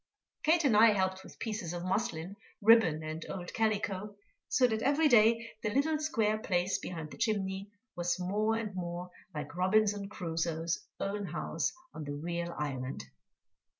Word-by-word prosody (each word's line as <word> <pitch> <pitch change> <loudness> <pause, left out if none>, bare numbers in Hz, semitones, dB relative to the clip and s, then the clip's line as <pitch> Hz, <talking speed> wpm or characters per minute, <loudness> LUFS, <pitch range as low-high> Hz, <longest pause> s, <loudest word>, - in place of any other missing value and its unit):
Kate 330 +1 +3
and 260 -7 +4
I 220 +1 +7
helped 190 -1 0
with - - -13
pieces 210 -6 -3
of 175 0 -4
muslin, 185 -2 -2 0.2
ribbon, 205 -8 +5
and 155 +1 -5
old 180 -2 -5
calico, 210 -2 -1 0.3
so 255 - +4
that 220 -3 +1
every 290 +5 +4
day 230 -2 +5
the 215 - 0
little 290 +7 +1
square 220 -9 +1
place 185 -2 0
behind 160 -4 -6
the - - -11
chimney 195 -2 -1 0.3
was 175 0 -1
more 210 +5 +1
and 220 -3 -3
more 180 0 -5 0.2
like 150 +2 -5
Robinson 200 +2 +2
Crusoe's 165 -3 -2
own 200 0 -2
house - - -1 0.2
on 155 - -6
the 145 - -4
real 170 +3 -3
island. 130 - -4
195 Hz, 155 wpm, -32 LUFS, 170-220 Hz, 0.3 s, I